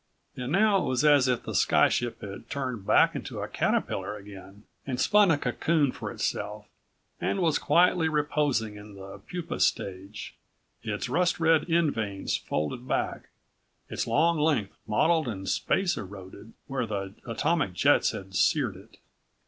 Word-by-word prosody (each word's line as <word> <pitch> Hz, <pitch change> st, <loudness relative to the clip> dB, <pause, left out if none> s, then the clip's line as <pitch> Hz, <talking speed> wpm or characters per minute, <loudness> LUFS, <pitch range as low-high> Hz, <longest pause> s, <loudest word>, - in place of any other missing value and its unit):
And 125 Hz, +1 st, -5 dB
now 200 Hz, +2 st, +4 dB
it -, -, -2 dB
was 130 Hz, +2 st, +1 dB
as 145 Hz, -3 st, +5 dB
if 125 Hz, -2 st, 0 dB
the -, -, -6 dB
sky -, -, +4 dB
ship 120 Hz, -1 st, -2 dB
had 100 Hz, -1 st, -9 dB
turned 130 Hz, -8 st, -4 dB
back -, -, +5 dB
into -, -, -5 dB
a -, -, -3 dB
caterpillar 105 Hz, -, -1 dB
again, 100 Hz, 0 st, -12 dB, 0.2 s
and 125 Hz, -2 st, -3 dB
spun 210 Hz, -2 st, +5 dB
a 160 Hz, -, +4 dB
cocoon 145 Hz, +2 st, +1 dB
for -, -, -6 dB
itself, -, -, -3 dB, 0.5 s
and -, -, -1 dB
was 165 Hz, -4 st, +2 dB
quietly 175 Hz, -2 st, +3 dB
reposing 145 Hz, -8 st, 0 dB
in 105 Hz, 0 st, -12 dB
the 95 Hz, 0 st, -10 dB
pupa 175 Hz, -, -6 dB
stage, 95 Hz, +2 st, -2 dB, 0.5 s
its -, -, -3 dB
rust 180 Hz, 0 st, +1 dB
red 160 Hz, 0 st, +3 dB
end 165 Hz, -3 st, +2 dB
vanes 100 Hz, -3 st, -2 dB
folded 75 Hz, -, -3 dB
back, -, -, -2 dB, 0.6 s
its -, -, -3 dB
long 170 Hz, 0 st, +2 dB
length 145 Hz, -10 st, +1 dB
mottled 155 Hz, +8 st, +2 dB
and 95 Hz, -4 st, -5 dB
space 190 Hz, -2 st, +1 dB
eroded 95 Hz, +2 st, -10 dB
where 130 Hz, -4 st, -3 dB
the 100 Hz, -2 st, -4 dB
atomic 145 Hz, -, 0 dB
jets 90 Hz, -, +3 dB
had 95 Hz, -1 st, -7 dB
seared 115 Hz, +3 st, +2 dB
it. 100 Hz, +5 st, -16 dB
125 Hz, 155 wpm, -27 LUFS, 100-160 Hz, 0.6 s, as